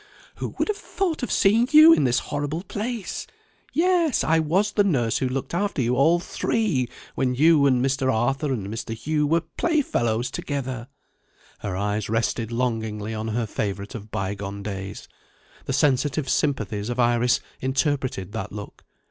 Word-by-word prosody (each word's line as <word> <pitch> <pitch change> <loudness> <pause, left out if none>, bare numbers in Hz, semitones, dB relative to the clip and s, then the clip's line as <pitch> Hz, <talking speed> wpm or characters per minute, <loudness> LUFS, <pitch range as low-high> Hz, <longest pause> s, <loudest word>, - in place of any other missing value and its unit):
Who - - -5
would - - 0
have 425 -1 -1
thought 355 -6 -2
of 245 - -3
seeing 225 +5 +4
you 310 +2 +9
in 140 - +3
this 120 -1 +2 0.2
horrible 145 +4 -2
place? 215 +2 -4 0.4
Yes; 340 -4 +2
I 160 +1 +3
was 185 +7 +1
the 205 - +3
nurse 125 - +1
who 130 - 0
looked 135 +4 -4
after 200 -1 -1
you 125 0 +1
all 160 +6 +4
three 175 - -1 0.2
when 125 -1 0
you 150 +1 +5
and 130 -1 +3
Mr. 135 0 +1
Arthur 135 +5 0
and 110 -7 -2
Mr. 115 +1 -5
Hugh 150 +5 0
were 165 +3 +2
playfellows 145 - 0
together." 130 -4 -4 0.7
Her 95 -3 -4
eyes 105 +1 -1
rested 115 0 -1
longingly 110 -3 -2
on 110 0 -4
her 115 +1 -1
favourite 100 0 -4
of 110 -3 -8
bygone 100 0 -4
days. 95 -1 -6 0.6
The 135 - -2
sensitive 135 +1 +1
sympathies 110 -7 -1
of 120 +1 -3
Iris 120 0 +3 0.2
interpreted 130 - -1
that 105 -2 -5
look. 105 0 -9
130 Hz, 160 wpm, -24 LUFS, 110-160 Hz, 0.7 s, you